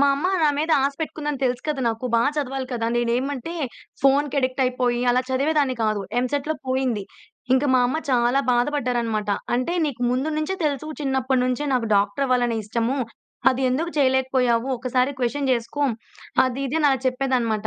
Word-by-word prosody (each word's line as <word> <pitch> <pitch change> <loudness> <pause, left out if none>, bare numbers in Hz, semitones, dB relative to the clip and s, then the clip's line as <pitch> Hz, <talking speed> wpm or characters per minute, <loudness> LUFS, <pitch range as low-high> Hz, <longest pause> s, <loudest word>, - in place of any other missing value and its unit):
మా 280 - +5
అమ్మ 285 +6 -1 0.2
నా 305 - +5
మీద 315 +2 0
ఆశ 280 +1 +1
పెట్టుకుందని 295 -3 -3
తెలుసు 250 -1 0
కదా! 295 -3 -1
నాకు 225 +2 -3
బాగా 235 +5 +3
చదవాలి 270 -2 -2
కదా! 230 -2 -1
నేనేమంటే 255 +6 -1 0.5
ఫోన్‌కి 280 +1 +3
అడిక్ట్ 255 0 0
అయిపోయి, 250 -1 0
అలా 250 +1 +3
చదివేదాన్ని 280 0 +1
కాదు. 215 -1 0 0.2
ఎంసెట్‌లో 285 +4 -1
పోయింది. 255 -5 0 0.5
ఇంకా 265 +2 +2
మా 255 - +5
అమ్మ 260 +6 -1
చాలా 245 +1 +3
బాధపడ్డారన్నమాట. 240 -5 0 0.2
అంటే, 255 +8 0
"నీకు 255 -4 -4
ముందు 260 +5 0
నుంచే 310 +5 -1
తెలుసు, 290 0 -1
చిన్నప్పటి 265 -2 +1
నుంచే 255 +3 -1
నాకు 245 -3 +1
డాక్టర్ 200 +7 +1
అవ్వాలనే 245 -2 +1
ఇష్టము, 230 +5 -1 0.5
అది 260 +1 -2
ఎందుకు 315 +7 -1
చేయలేకపోయావు? 260 -2 +2
ఒక్కసారి 255 +2 0
క్వశ్చన్ 270 +3 0
చేసుకో" 240 +4 -2 0.6
అది, 255 +1 -2
ఇది 285 +5 -1
అని 265 -2 0
చెప్పేదన్నమాట. 250 -5 0
255 Hz, 160 wpm, -23 LUFS, 240-280 Hz, 0.6 s, మా